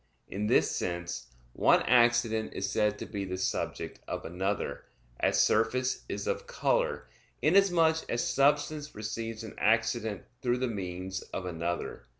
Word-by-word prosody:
In 105 +2 -3
this - - +4
sense 85 -6 -3 0.3
one - - +4
accident 120 -2 +3
is 95 - -1
said 105 0 +1
to - - -6
be 100 -3 -4
the 95 -1 -4
subject 95 - -3
of - - -4
another; 95 +4 -2 0.3
as - - +2
surface 125 +4 +1
is - - -3
of 485 0 -2
color, - - 0 0.4
inasmuch 175 -5 +5
as 120 - 0
substance 145 +1 +1
receives 110 +1 -4
an 110 - -8
accident 110 -1 +1 0.2
through 120 -1 +1
the 130 0 0
means 95 -3 -4
of 95 - -6
another. 85 -7 -4
110 Hz, 145 wpm, -30 LUFS, 95-130 Hz, 0.4 s, inasmuch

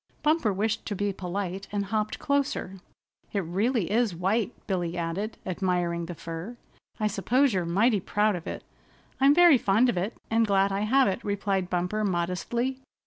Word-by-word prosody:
Bumper 300 -7 +3
wished 215 +3 -1
to 205 - -2
be 205 +1 -1
polite 190 +1 -4
and 205 -1 -1
hopped 215 +1 -1
closer. 280 -10 -1 0.5
"It 200 - +1
really 195 +4 0
is 225 -4 +2
white," 200 +6 0
Billy 175 -3 -2
added, 175 +6 -3
admiring 175 -2 -1
the 175 - -6
fur. 165 +9 -7 0.4
"I 215 - 0
suppose 240 +6 +2
you're 185 -2 0
mighty 205 +6 +3
proud 205 +2 +1
of 170 - -7
it." - - -5 0.6
"I'm 275 +2 +6
very 345 -6 +7
fond 220 +6 +3
of 205 - -1
it, 195 +6 -2
and 225 0 +3
glad 195 0 +3
I 195 - -1
have 260 +6 +3
it," 195 +4 -2
replied 195 -2 -1
Bumper 180 +4 -1
modestly. 200 +8 -1
200 Hz, 170 wpm, -27 LUFS, 180-225 Hz, 0.6 s, very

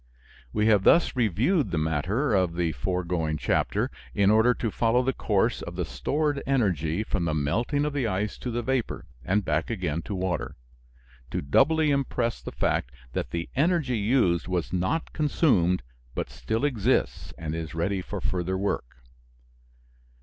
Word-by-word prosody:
We 105 - +1
have 105 -3 +5
thus 170 - +5
reviewed 125 - +2
the 85 - -2
matter 85 - 0
of 90 -4 +2
the 85 -2 0
foregoing 85 -2 -1
chapter - - 0 0.2
in 100 0 +4
order 110 +3 +5
to 115 - -2
follow 120 +4 +2
the 135 +1 +1
course 100 -5 +1
of - - -7
the - - -1
stored 140 - -1
energy 95 - +1
from 95 -5 -1
the 80 -2 0
melting 115 - 0
of 150 - -2
the 135 -5 0
ice 105 +1 -2
to 125 - -4
the 120 0 -2
vapor, 130 -1 -1 0.2
and 100 +7 +1
back 75 0 0
again 90 -8 -2
to 100 - -4
water: 90 -1 -2 0.7
to - - -3
doubly 150 - +3
impress 130 -4 0
the - - -6
fact - - 0 0.2
that - - -2
the 85 0 -3
energy 140 -5 +2
used 100 -6 +2
was 90 -2 -2
not 95 - -1
consumed, 105 - +2 0.3
but - - -3
still 110 +5 -2
exists 125 -3 0
and 80 -2 -4
is 80 -1 -5
ready 95 +4 0
for 100 +2 -5
further 95 -2 -1
work. 65 -10 -3
100 Hz, 165 wpm, -26 LUFS, 85-125 Hz, 0.7 s, have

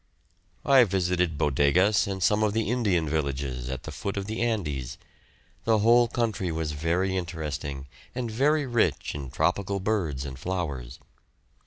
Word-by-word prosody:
I 135 -2 +7
visited 90 -5 0
Bodegas 75 +11 +3
and 95 -2 -3
some 105 +3 +3
of 105 -1 +2
the 110 -1 0
Indian 100 -10 +1
villages 70 -4 -2
at 65 -1 -5
the - - -7
foot 100 0 -4
of 100 - -2
the 110 +3 -4
Andes. 75 - -2 0.7
The 115 -1 +3
whole 120 +3 +5
country 110 -6 -1
was 80 -1 -2
very 85 +5 0
interesting, 75 -6 -4 0.3
and 120 -3 -3
very 145 +6 +2
rich 120 -3 0
in 70 -3 -6
tropical 90 +8 0
birds 90 -10 -1
and 65 -2 -7
flowers. 70 -10 -4
90 Hz, 150 wpm, -27 LUFS, 75-110 Hz, 0.7 s, I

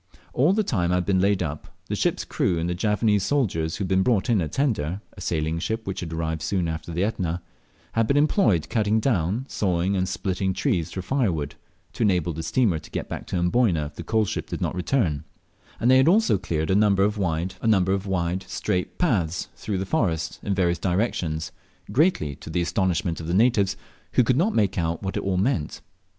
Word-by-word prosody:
All 145 +8 +4
the 215 +2 +2
time 90 - 0
I - - +3
had 90 -1 0
been 95 -2 +2
laid 100 -1 +2
up 75 -2 -7
the - - -3
ship's - - 0
crew 90 -4 0
and 80 +1 -1
the 90 - 0
Javanese 105 +2 +1
soldiers 90 - 0
who 100 - -3
had - - -2
been 95 0 +2
brought 115 0 +2
in 105 -5 +3
a 80 - -1
tender 95 - -1 0.2
(a 100 - -10
sailing 80 -1 -1
ship 110 +6 -3
which 95 - -4
had 85 -2 -5
arrived 80 -1 -2
soon 90 +1 0
after 80 +1 -4
the 85 +3 0
Etna), 90 -5 -1 0.5
had 115 -1 +1
been 140 - +2
employed 145 - +3
cutting 110 -1 +1
down, 110 0 0
sawing, 95 -3 0
and 95 0 0
splitting 95 +1 -2
large 95 - -2
trees 85 -2 0
for 95 - -5
firewood, 90 - 0 0.4
to - - -7
enable 90 -6 +2
the 80 - -5
steamer 100 -3 +1
to - - -14
get - - -4
back - - -6
to - - -4
Amboyna 90 -2 +2
if 75 - -8
the - - -6
coal 110 -1 +1
ship - - -4
did - - -4
not - - -1
return; 90 - 0 0.6
and 120 - +3
they 130 - +7
had 130 - +5
also 195 - +4
cleared 80 -3 -1
a - - +3
number 100 -2 +4
of 105 +1 0
wide, 85 0 -1 0.9
straight 90 +1 -2
paths 90 - 0
through 105 -3 -3
the 95 - -2
forest 85 - -1
in 100 - -1
various 85 -3 +1
directions, 85 -5 -1 0.4
greatly 125 - +2
to 75 - -10
the 85 +2 0
astonishment 90 -2 0
of 80 - -6
the 85 - 0
natives, 105 -3 +3 0.4
who 125 - +5
could 125 +2 +2
not 185 - +1
make 100 -4 +2
out 85 +1 -2
what 95 - -3
it - - -1
all 95 -1 -1
meant. 95 - -1
95 Hz, 215 wpm, -24 LUFS, 85-110 Hz, 0.9 s, they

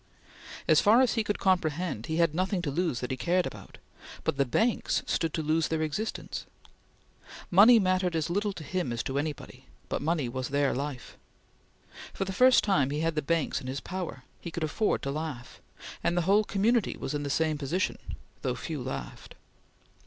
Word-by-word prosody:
As - - +6
far 225 +4 +6
as 250 - +2
he 225 - +1
could 205 0 -1
comprehend, 170 - 0
he 160 - -2
had 170 -2 +3
nothing 185 +1 -1
to 145 - -1
lose 165 -4 -1
that 125 - -3
he 130 - -2
cared 180 +5 +1
about, - - -9 0.5
but - - 0
the 140 0 +2
banks 225 - +1
stood 165 -2 0
to 160 - -2
lose 155 +1 +1
their 160 -1 -1
existence. 180 +9 -4 1.0
Money 215 +7 +8
mattered 185 -3 +1
as 160 0 0
little 205 +4 0
to 170 - -8
him 175 -2 -2
as 115 -1 -2
to 135 +1 -2
anybody, 150 -1 -6 0.2
but - - -2
money 155 -3 0
was 130 +1 -4
their 140 0 +1
life. 140 -1 -5 1.0
For 195 - -2
the 190 - -4
first 255 +5 +6
time 185 -10 +2
he 145 +2 -2
had 165 0 +1
the 155 - -1
banks 160 -1 0
in 130 - -8
his 135 +2 -3
power; 180 -8 -6 0.2
he - - -6
could 165 0 -4
afford 180 +8 0
to 140 - -2
laugh; 150 -5 -6 0.4
and 175 - +1
the - - +3
whole 205 +4 +4
community 210 +2 +1
was - - -4
in 145 - -1
the 145 - -3
same 155 0 +1
position, 165 +7 -1 0.4
though 125 -1 -1
few 150 +2 -5
laughed. 95 - -7
160 Hz, 195 wpm, -28 LUFS, 140-185 Hz, 1.0 s, Money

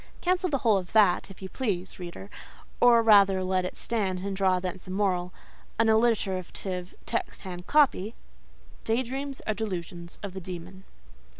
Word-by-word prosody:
Cancel 365 0 +1
the 280 - +1
whole 225 -5 +3
of 180 -2 -6
that, 205 -3 +4
if 195 0 -12
you 190 - -6
please, 195 -8 -3
reader—or 205 +6 0
rather 200 -3 +6
let 185 0 0
it 180 - -5
stand, 195 -5 -1
and 200 -1 -2
draw 190 -1 +2
thence 185 +1 -6
a - - -9
moral—an 190 +3 -2
alliterative, 190 -5 0
text - - -3
hand 180 -1 -7
copy— 260 -8 +3 0.7
Day 230 +3 +1
dreams 270 +2 -5
are 215 - 0
delusions 175 -5 -5
of 200 -2 -5
the 190 - -6
demon. 180 +1 -9
195 Hz, 155 wpm, -27 LUFS, 185-225 Hz, 0.7 s, rather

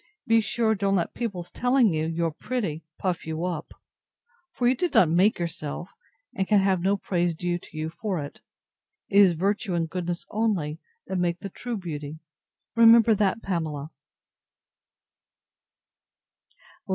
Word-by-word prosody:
Be 225 0 +4
sure 220 +1 +1
don't 200 -1 +1
let 175 -3 -1
people's 200 -8 -4
telling 245 -5 +3
you, 155 0 0
you 165 +1 -1
are 165 - 0
pretty, 170 -3 -3 0.2
puff 180 -4 -2
you 160 +2 -2
up; 170 -4 -4 0.8
for 245 - 0
you 250 - +5
did 345 +7 -2
not 165 -4 +6
make 185 +6 +4
yourself, 170 0 -4 0.4
and 190 - -1
so - - -23
can 210 -2 +5
have 190 -2 +2
no 195 +3 +2
praise 175 -3 -1
due 175 +1 -2
to 155 - -13
you 155 +1 -3
for 200 +1 -3
it. 145 -1 -8 0.7
It 200 - +4
is 190 -4 +7
virtue 195 +3 -1
and 165 -1 0
goodness 175 0 -4
only, 190 -9 -1 0.3
that 190 -1 -2
make 175 0 -1
the 200 - -5
true 240 +4 -5
beauty. 155 -5 -6 0.6
Remember 230 -1 +7
that, 205 +1 +1
Pamela. 155 -5 -3
180 Hz, 155 wpm, -26 LUFS, 165-210 Hz, 0.8 s, is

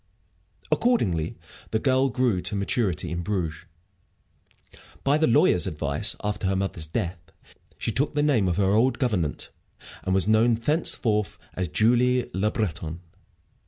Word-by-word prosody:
Accordingly 95 - +1 0.3
the - - 0
girl 130 +3 +2
grew 125 -7 +1
to 105 - -3
maturity 100 -2 -1
in 85 0 -2
Bruges. 85 -4 -3 1.4
By 145 +2 +2
the 160 - +3
lawyer's 90 -7 +4
advice, 75 +8 -1
after 105 -1 -2
her 95 - +1
mother's 95 -4 -1
death, 85 +2 -3 0.6
she - - -2
took 145 +2 -1
the 145 - +2
name 130 -10 +2
of 90 -1 0
her 95 -1 +2
old 120 +5 +3
gouvernante, 100 - -1 0.5
and 95 - 0
was 95 +1 +1
known 110 +2 +4
thenceforward 115 - +1 0.3
as 90 -1 -2
Julie 125 +7 +2
Le 100 +3 +1
Breton. 85 -6 -3
105 Hz, 140 wpm, -25 LUFS, 90-125 Hz, 1.4 s, lawyer's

